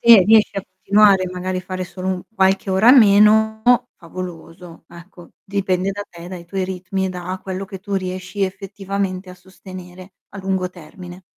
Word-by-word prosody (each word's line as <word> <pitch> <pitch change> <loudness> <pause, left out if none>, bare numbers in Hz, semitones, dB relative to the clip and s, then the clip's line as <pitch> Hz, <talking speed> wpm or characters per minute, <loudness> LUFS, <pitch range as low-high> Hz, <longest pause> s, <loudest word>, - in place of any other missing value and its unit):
Se 230 -4 +8
riesci 215 +1 +4
a 195 - -2
continuare, 195 +1 +3
e 180 - -5
magari 185 0 -3
a - - -4
fare 185 0 -5
solo 185 +1 -6
u 185 -1 -2
qualche 190 0 +1
ora 200 +6 +5
meno 220 -2 +5 0.3
favoloso, 170 -1 -10
ecco, 175 +1 -14
dipende 195 -2 -1
da 205 +1 -5
te, 170 0 -12
dai 180 -2 -8
tuoi 190 +1 -3
ritmi 190 +1 -4
e - - -2
da 180 +1 -5
quello 190 0 -5
che 190 0 -8
tu 200 0 -5
riesci 185 +1 -4
effettivamente 195 -1 -4
a 180 - -11
sostenere 185 0 -13 0.2
a 200 - -10
lungo 190 -1 -2
termine. 175 +2 -12
185 Hz, 175 wpm, -20 LUFS, 180-195 Hz, 0.3 s, Se